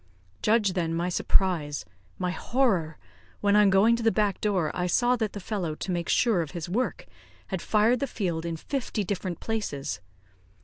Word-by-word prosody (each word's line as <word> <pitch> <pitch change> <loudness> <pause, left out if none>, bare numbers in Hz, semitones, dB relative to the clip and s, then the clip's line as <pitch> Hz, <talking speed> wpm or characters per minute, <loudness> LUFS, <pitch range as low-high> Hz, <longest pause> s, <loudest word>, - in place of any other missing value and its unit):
Judge 210 -3 +3
then, 165 -3 -1
my 175 +2 0
surprise, 170 -5 +1 0.3
my 180 -1 -1
horror, 190 - 0 0.4
when, 205 0 +3
on 210 -1 +6
going 200 +5 +5
to 235 - -4
the 225 0 +3
back 210 -3 0
door, 190 -7 +1
I 180 0 -1
saw 240 +7 +3
that 220 -3 -2
the 205 - -5
fellow, 180 -5 -3
to 185 - -4
make 175 -1 -2
sure 225 -8 +3
of 160 - -5
his 170 +1 -4
work, 225 +4 -2 0.4
had 190 - -3
fired 225 +3 +3
the 275 - -1
field 175 -9 -2
in 165 -1 -3
fifty 240 - -3
different 185 -3 -3
places. 205 - -3
195 Hz, 180 wpm, -27 LUFS, 170-220 Hz, 0.4 s, on